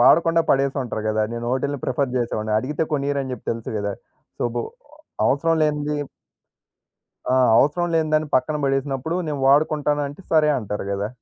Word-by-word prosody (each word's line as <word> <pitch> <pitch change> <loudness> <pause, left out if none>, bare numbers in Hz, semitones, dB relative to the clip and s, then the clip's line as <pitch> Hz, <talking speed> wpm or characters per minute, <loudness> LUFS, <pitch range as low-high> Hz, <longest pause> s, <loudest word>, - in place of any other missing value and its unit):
వాడకుండా 165 +6 +5
పడేసుంటారు 135 -5 0
గదా! 110 0 +1
నేను 120 0 -4
ఒటిల్ని 140 +1 -2
ప్రిఫర్ 130 0 -1
జేసేవాడిని. 110 -3 -1
అడిగితే 150 +4 -2
కొనీయరని 140 -2 -1
జెప్పి - - -8
తెలుసు 115 -1 -6
గదా! 100 0 -2 0.5
సో - - -2
బొ 120 - -1 0.6
అవసరం 165 +4 +2
లేనిది 150 0 0 1.4
ఆ! - - +3 0.2
అవసరం 175 +5 +2
లేని 160 -1 +1
దాన్ని 155 -1 +1
పక్కన 150 +4 0
బడేసినప్పుడు 135 +4 -1
నేను 145 -2 -3
వాడుకుంటానంటే, 145 +1 +2
సరే 155 -1 +5
అంటారు 105 -3 -4
గదా! 100 +1 -2
140 Hz, 145 wpm, -22 LUFS, 125-150 Hz, 1.4 s, వాడకుండా